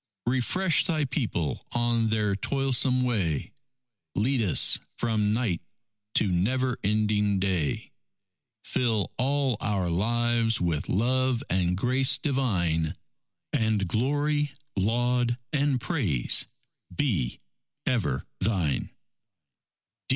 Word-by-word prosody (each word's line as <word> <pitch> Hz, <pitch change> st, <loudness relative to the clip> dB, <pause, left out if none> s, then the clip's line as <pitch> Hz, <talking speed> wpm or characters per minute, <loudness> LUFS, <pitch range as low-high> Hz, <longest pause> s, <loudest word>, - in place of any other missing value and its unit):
Refresh 155 Hz, +11 st, +2 dB
Thy 155 Hz, -4 st, +1 dB
people 110 Hz, -, -2 dB
on 120 Hz, -2 st, +1 dB
their 105 Hz, -2 st, +1 dB
toilsome 130 Hz, +2 st, +1 dB
way; 95 Hz, -, -1 dB, 0.6 s
Lead 125 Hz, +5 st, +1 dB
us 100 Hz, -7 st, +4 dB, 0.2 s
from 110 Hz, -3 st, +1 dB
night 110 Hz, -7 st, 0 dB, 0.5 s
to 110 Hz, -, +4 dB
never 120 Hz, +8 st, 0 dB
ending 105 Hz, -1 st, +1 dB
day; 95 Hz, -6 st, -1 dB, 0.7 s
Fill 115 Hz, -5 st, 0 dB
all 135 Hz, -2 st, +1 dB
our 100 Hz, -5 st, -1 dB
lives 115 Hz, +4 st, +1 dB
with 85 Hz, -4 st, -1 dB
love 130 Hz, +4 st, +1 dB
and 90 Hz, -1 st, +1 dB
grace 130 Hz, +5 st, +2 dB
divine; 90 Hz, -, 0 dB, 0.6 s
And 110 Hz, -3 st, +1 dB
glory, 145 Hz, -, 0 dB, 0.2 s
laud, 120 Hz, +4 st, +1 dB, 0.2 s
and 140 Hz, -3 st, +2 dB
praise 110 Hz, -, +1 dB, 0.5 s
be 100 Hz, -, -1 dB, 0.5 s
ever 75 Hz, -, 0 dB, 0.2 s
Thine! 95 Hz, -8 st, 0 dB
115 Hz, 95 wpm, -27 LUFS, 95-130 Hz, 0.7 s, us